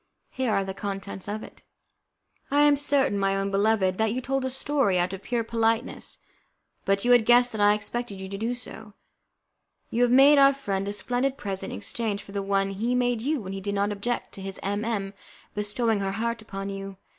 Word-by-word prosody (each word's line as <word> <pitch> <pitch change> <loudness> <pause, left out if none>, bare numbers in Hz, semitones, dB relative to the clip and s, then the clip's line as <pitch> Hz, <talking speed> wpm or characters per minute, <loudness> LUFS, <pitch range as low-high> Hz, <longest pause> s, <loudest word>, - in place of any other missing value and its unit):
Here 260 -3 -1
are 195 - +2
the 190 0 -5
contents 195 -1 -5
of 215 +1 -4
it: - - -13 0.9
"I 285 +1 +3
am 295 -1 +6
certain, 275 -7 +2
my 195 0 +1
own 195 0 -1
beloved, 195 -2 +2
that 220 -1 +2
you 245 - -1
told 270 +1 -1
a 260 - -1
story 265 -6 +1
out 180 +2 0
of 195 - -6
pure 235 +2 -1
politeness, 225 +1 -1 0.7
but 195 +2 +1
you 245 - +4
had 245 -2 +7
guessed 245 +2 +5
that 220 - -3
I 205 0 +6
expected 210 0 -4
you 190 - -6
to 195 - -6
do 235 +3 -1
so. 220 -3 -9 1.0
You 235 - 0
have 245 -1 +4
made 280 +3 +7
our 275 0 +7
friend 200 -8 -3
a - - -1
splendid 250 +5 -1
present 195 -5 -4
in - - -5
exchange 205 - -3
for 200 - -13
the 200 0 -2
one 195 0 0
he 230 +6 -1
made 245 -2 +1
you 285 +2 0
when 190 -1 -6
he 195 - -5
did 200 +1 -3
not 200 +1 +1
object 205 +4 -3
to 195 - -10
his 195 0 -6
M 205 +2 -1
M 205 -4 -2 0.4
bestowing 210 +1 0
her 195 -1 -2
heart 230 +2 -2
upon 195 -2 -6
you. 195 -1 -6
215 Hz, 215 wpm, -26 LUFS, 195-245 Hz, 1.0 s, had